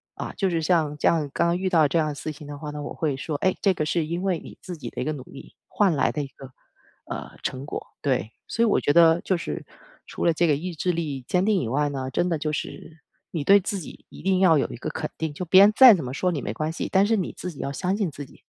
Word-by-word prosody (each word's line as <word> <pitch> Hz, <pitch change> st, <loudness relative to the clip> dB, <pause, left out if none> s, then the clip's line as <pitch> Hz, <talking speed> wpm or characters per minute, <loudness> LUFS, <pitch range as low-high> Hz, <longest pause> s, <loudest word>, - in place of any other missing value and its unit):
啊， -, -, -6 dB
就 195 Hz, -, +1 dB
是 165 Hz, -2 st, 0 dB
像 155 Hz, -3 st, +1 dB
这 -, -, +1 dB
样 155 Hz, -4 st, +2 dB
刚 170 Hz, -, +2 dB
刚 170 Hz, -, +1 dB
遇 190 Hz, 0 st, 0 dB
到 160 Hz, -5 st, +4 dB
这 165 Hz, +4 st, +1 dB
样 155 Hz, -, +1 dB
的 145 Hz, -, -5 dB
事 155 Hz, -, -5 dB
情 150 Hz, 0 st, -11 dB
的 145 Hz, 0 st, -7 dB
话 150 Hz, 0 st, -6 dB
呢， 150 Hz, 0 st, -6 dB
我 -, -, -6 dB
会 150 Hz, -4 st, -1 dB
说， 150 Hz, +3 st, -4 dB
诶， 185 Hz, +5 st, +1 dB
这 195 Hz, -, +3 dB
个 155 Hz, -, -1 dB
是 160 Hz, +1 st, 0 dB
因 170 Hz, +3 st, -3 dB
为 185 Hz, -4 st, 0 dB
你 -, -, -12 dB
自 180 Hz, -, -7 dB
己 150 Hz, -, -7 dB
的 -, -, -6 dB
一 -, -, -2 dB
个 155 Hz, -, -1 dB
努 145 Hz, -, -7 dB
力 135 Hz, -, -13 dB
换 195 Hz, -6 st, +2 dB
来 -, -, +2 dB
的 150 Hz, -, -3 dB
一 -, -, -6 dB
个， 135 Hz, 0 st, -13 dB, 0.5 s
呃， -, -, -6 dB
成 130 Hz, +1 st, -3 dB
果， -, -, -5 dB, 0.2 s
对。 130 Hz, -5 st, 0 dB, 0.2 s
所 230 Hz, -, 0 dB
以 -, -, +5 dB
我 215 Hz, -, +3 dB
觉 145 Hz, -, +1 dB
得 165 Hz, 0 st, +6 dB
就 190 Hz, -, 0 dB
是 170 Hz, -, -5 dB, 0.4 s
除 -, -, -5 dB
了 170 Hz, -, +4 dB
这 170 Hz, +2 st, +2 dB
个 150 Hz, -, +3 dB
意 175 Hz, +5 st, -5 dB
志 180 Hz, +3 st, -1 dB
力 150 Hz, -5 st, -3 dB
坚 180 Hz, 0 st, +2 dB
定 210 Hz, -2 st, +3 dB
以 -, -, -3 dB
外 145 Hz, +5 st, +1 dB
呢， 135 Hz, -2 st, -4 dB
真 175 Hz, +6 st, 0 dB
的 165 Hz, -, 0 dB
就 155 Hz, 0 st, -3 dB
是 155 Hz, +2 st, -6 dB, 0.3 s
你 160 Hz, -4 st, -2 dB
对 200 Hz, +6 st, +7 dB
自 200 Hz, +1 st, -3 dB
己 165 Hz, -, -11 dB
一 -, -, -12 dB
定 190 Hz, 0 st, +2 dB
要 175 Hz, -4 st, +5 dB
有 140 Hz, -, 0 dB
一 -, -, -7 dB
个 -, -, -4 dB
肯 -, -, -4 dB
定， 160 Hz, -2 st, -3 dB
就 165 Hz, -, -5 dB
别 185 Hz, +3 st, +6 dB
人 205 Hz, +2 st, +7 dB
再 255 Hz, -2 st, +10 dB
怎 170 Hz, -9 st, -1 dB
么 125 Hz, -, -5 dB
说 180 Hz, +6 st, 0 dB
你 150 Hz, -5 st, -3 dB
没 100 Hz, -, -4 dB
关 155 Hz, +7 st, -2 dB
系， 165 Hz, -, -4 dB
但 195 Hz, +1 st, +4 dB
是 225 Hz, 0 st, +2 dB
你 185 Hz, -, -3 dB
自 180 Hz, -, -5 dB
己 145 Hz, -, -14 dB
要 140 Hz, -, -3 dB
相 185 Hz, +7 st, -1 dB
信 200 Hz, -5 st, 0 dB
自 145 Hz, 0 st, -8 dB
己。 135 Hz, -, -20 dB
160 Hz, 325 characters per minute, -25 LUFS, 145-185 Hz, 0.5 s, 再